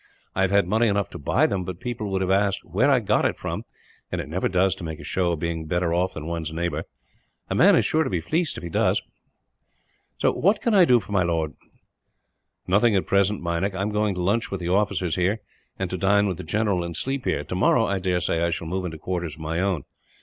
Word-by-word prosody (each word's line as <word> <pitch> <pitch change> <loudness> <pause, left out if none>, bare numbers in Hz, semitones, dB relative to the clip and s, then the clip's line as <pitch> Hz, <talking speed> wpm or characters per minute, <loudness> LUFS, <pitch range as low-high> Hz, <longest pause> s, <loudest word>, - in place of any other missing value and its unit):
I 95 - -1
have 95 - +3
had 100 -2 +3
money 110 +5 +2
enough 100 -2 0
to - - -8
buy 70 - +2
them; 95 -2 -1
but 90 -1 -6
people 115 -3 -4
would 95 -1 -1
have 95 - 0
asked 100 0 +1
where 100 - +2
I 135 -3 +5
got 105 - +2
it - - 0
from, - - -4 0.5
and - - -2
it - - -4
never 85 +5 -1
does 95 0 +2
to 95 - -10
make 80 -1 -5
a - - -9
show 90 -2 0
of 80 - -3
being 80 -1 -3
better 85 +1 0
off 90 +2 0
than 75 - -6
one's 85 -1 -3
neighbour. 85 +2 -2 0.7
A - - +2
man - - +6
is - - +3
sure 160 +1 +2
to - - -3
be 90 - 0
fleeced, 160 - -1
if - - -8
he 85 - -5
does. - - +2 1.2
"What 200 +6 +3
can 235 - 0
I 190 -3 +7
do 125 -6 +5
for 105 -1 -11
my 100 -2 +3
lord?" 80 -3 0 1.1
"Nothing, 105 +4 +3
at 95 - +1
present, 100 0 +1
Meinik. 85 +3 -1
I 95 - -1
am 105 - -1
going 105 -2 0
to 90 - -2
lunch 110 +5 +1
with 95 - -4
the 85 - -2
officers 95 -3 +1
here, 95 +5 +1 0.4
and 95 - -2
to 95 - -3
dine 100 +2 +3
with 90 -4 -2
the - - -7
general, 100 +1 0
and 85 -1 -5
sleep 135 -1 -2
here. - - 0
Tomorrow 95 +5 +2
I 100 -2 -1
daresay 90 -2 0
I 85 - +2
shall 85 0 -3
move 90 +3 -3
into 80 -3 -5
quarters 85 -2 -4
of 80 - -13
my 80 +2 -2
own. 95 -6 0
95 Hz, 245 wpm, -24 LUFS, 85-100 Hz, 1.2 s, I